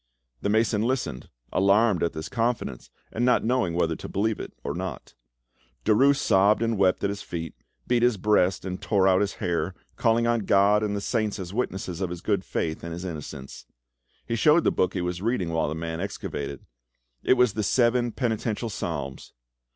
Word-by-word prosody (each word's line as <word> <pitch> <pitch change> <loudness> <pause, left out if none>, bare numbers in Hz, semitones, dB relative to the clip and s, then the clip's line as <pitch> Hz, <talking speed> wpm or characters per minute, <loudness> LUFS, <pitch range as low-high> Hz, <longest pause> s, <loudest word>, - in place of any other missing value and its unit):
The - - -1
mason 110 0 +2
listened, 120 - -2 0.2
alarmed 100 +1 +3
at 85 - 0
this 80 0 -5
confidence, 115 - -2 0.2
and 115 - -2
not 125 0 +3
knowing 115 -8 +1
whether 85 -2 +1
to - - -8
believe 110 +2 0
it - - -6
or - - -2
not. - - -6 0.7
Derues 135 +7 +5
sobbed 100 +2 +3
and 115 0 +1
wept 95 -2 +2
at 100 - +1
his 100 - -6
feet, 80 -2 -5 0.3
beat 120 -1 +2
his 120 -3 +3
breast 95 -2 +2
and 90 -1 -4
tore 95 -3 +2
out 95 0 +4
his 100 -1 0
hair, 90 +1 -2 0.2
calling 115 0 +2
on 120 0 +2
God 100 +1 +4
and 105 -1 -1
the 100 - -2
saints 110 -1 -1
as 95 -1 -6
witnesses 95 -6 -3
of 95 - -1
his 90 -1 -6
good 100 -3 0
faith 80 -3 -3
and 85 0 -5
his 90 +2 -6
innocence. 75 -5 -7 0.6
He 115 - -2
showed 150 +8 +4
the - - +3
book 90 - 0
he 90 - 0
was 90 0 -3
reading 110 -5 0
while 80 -2 0
the 80 - -3
mason 80 0 -4
excavated: 70 -8 -5 0.6
it - - +4
was 125 -4 +3
the 110 - -2
Seven 120 +3 +2
Penitential 110 -1 -2
Psalms. 70 -8 -5
100 Hz, 190 wpm, -26 LUFS, 90-115 Hz, 0.7 s, Derues